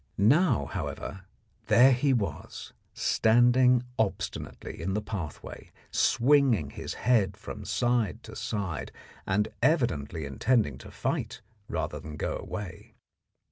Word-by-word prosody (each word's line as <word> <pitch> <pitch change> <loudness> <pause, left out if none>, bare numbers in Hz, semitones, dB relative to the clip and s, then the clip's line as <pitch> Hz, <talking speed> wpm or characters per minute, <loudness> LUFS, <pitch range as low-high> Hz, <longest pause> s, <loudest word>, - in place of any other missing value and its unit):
Now, 120 - +4
however, 95 +6 -5 0.4
there 130 +3 +7
he 135 +2 +2
was, 115 -6 -3 0.2
standing 120 +2 +4 0.2
obstinately 105 -6 -3
in 95 +3 -2
the 105 - 0
pathway, 95 -8 -7 0.2
swinging 120 - +3
his - - -6
head 105 -5 +2
from 105 -1 -8
side 120 -5 0
to - - -10
side, 95 -8 -3 0.4
and 100 +2 +1
evidently 115 - +1
intending 70 - +1
to - - -11
fight - - -3 0.3
rather - - -3
than 75 -1 -8
go - - -2
away. 90 -5 -7
105 Hz, 115 wpm, -28 LUFS, 90-125 Hz, 0.4 s, there